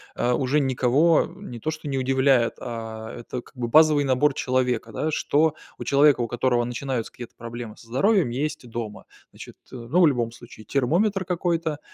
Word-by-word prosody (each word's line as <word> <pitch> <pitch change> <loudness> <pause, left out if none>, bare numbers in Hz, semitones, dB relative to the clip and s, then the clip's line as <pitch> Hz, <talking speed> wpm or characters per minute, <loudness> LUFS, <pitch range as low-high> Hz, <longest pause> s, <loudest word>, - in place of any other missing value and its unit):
э, 120 - 0
уже 135 +4 +1
никого 135 +5 +3
не 175 - -9
то 155 - -2
что 155 -2 -7
не 135 - -1
удивляет, 130 -2 +2
а 110 -2 -6
это 125 +1 -6
как - - -21
бы 120 -1 -2
базовый 150 +2 +5
набор 135 +2 +2
человека, 125 -4 -1
да. 155 +1 -1
Что 155 +1 +1 0.2
у - - -6
человека, 140 -2 +4
у 115 - -1
которого 120 0 +1
начинаются 125 0 -3
какие-то 120 -2 -10
проблемы 115 -1 -8
со 115 - -17
здоровьем, 190 - +2
есть 145 +2 -3
дома. 110 -2 -6 0.3
Значит, - - -12 0.2
э, - - -6
ну, 125 +8 -1
в 170 - +7
любом 120 -5 0
случае 120 -2 -13
термометр 185 - +1
какой-то, 170 -3 -1
130 Hz, 180 wpm, -24 LUFS, 120-150 Hz, 0.3 s, в